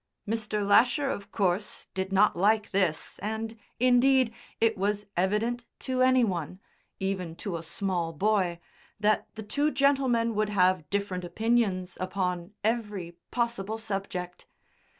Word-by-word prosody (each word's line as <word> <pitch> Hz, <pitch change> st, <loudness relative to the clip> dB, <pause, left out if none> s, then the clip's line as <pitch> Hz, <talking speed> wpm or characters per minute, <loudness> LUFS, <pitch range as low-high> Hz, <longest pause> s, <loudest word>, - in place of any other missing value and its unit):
Mr. 215 Hz, -2 st, -1 dB
Lasher 255 Hz, +7 st, +4 dB
of 200 Hz, -, -6 dB
course 195 Hz, 0 st, -1 dB
did 190 Hz, 0 st, -2 dB
not 195 Hz, +2 st, +4 dB
like 210 Hz, +4 st, +2 dB
this, 185 Hz, -6 st, 0 dB
and, 220 Hz, +2 st, -3 dB, 0.2 s
indeed, 255 Hz, 0 st, +4 dB, 0.3 s
it 225 Hz, -1 st, +3 dB
was 205 Hz, +1 st, -1 dB
evident 215 Hz, +6 st, 0 dB
to 255 Hz, -1 st, -2 dB
any 255 Hz, -1 st, +5 dB
one 180 Hz, -3 st, -2 dB, 0.4 s
(even 190 Hz, -4 st, -2 dB
to 195 Hz, 0 st, -4 dB
a 165 Hz, -, -4 dB
small 170 Hz, 0 st, -2 dB
boy) 185 Hz, 0 st, +1 dB, 0.4 s
that 210 Hz, 0 st, +2 dB
the 220 Hz, -, -6 dB
two 285 Hz, +8 st, +1 dB
gentlemen 265 Hz, -5 st, +2 dB
would 215 Hz, 0 st, 0 dB
have 185 Hz, -5 st, +2 dB
different 200 Hz, -3 st, -2 dB
opinions 195 Hz, -2 st, 0 dB
upon 180 Hz, -1 st, -2 dB
every 210 Hz, -6 st, -1 dB, 0.2 s
possible 235 Hz, -3 st, -1 dB
subject. 195 Hz, -4 st, -5 dB
205 Hz, 130 wpm, -28 LUFS, 185-230 Hz, 0.4 s, any